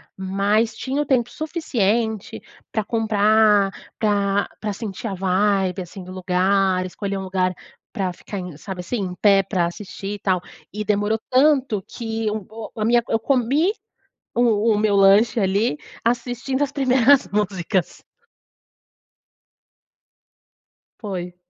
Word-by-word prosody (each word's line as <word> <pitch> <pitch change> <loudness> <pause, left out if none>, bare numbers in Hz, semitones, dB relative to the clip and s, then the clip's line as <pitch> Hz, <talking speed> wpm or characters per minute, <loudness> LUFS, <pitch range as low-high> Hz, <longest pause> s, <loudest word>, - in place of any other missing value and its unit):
Mas, 200 +4 +1
tinha 270 +5 -2
o 295 - -2
tempo 240 -3 +1
suficiente, 230 - -1 0.3
pra 220 - -1
comprar, 215 -2 +3 0.3
pra 205 -2 +1
pra 210 -1 -2
sentir 215 +1 -6
a 200 - -3
vibe, 190 0 +1
assim, 180 +2 -9
do 185 - -9
lugar, 185 0 +1
escolher 195 +2 -4
um 190 - -4
lugar 185 -1 0 0.4
pra 185 -3 -2
ficar 200 +3 -7
em 180 -4 -7
sabe 190 +1 -7
assim? 185 +7 -3
Em 180 -2 -4
pé 195 0 +4
pra 185 -3 0
assistir 195 +2 -6
e 205 - -6
tal. 185 -3 0 0.3
E 210 0 -4
demorou 210 +1 +1
tanto 260 -6 +3
que 225 -2 -3
um 210 -3 -4
o 220 0 -8
a 215 - 0
minha 235 0 +3
eu 225 - +2
comi 275 - +2 0.6
o 225 -2 +3
o - - +1
meu 210 -2 +2
lanche 200 +4 +5
ali 195 -3 +1 0.3
assistindo 245 +3 -1
as 285 - -6
primeiras 265 0 +4
músicas. 190 -2 -1 3.0
Foi. 180 -5 -5
210 Hz, 135 wpm, -22 LUFS, 190-230 Hz, 3.0 s, lanche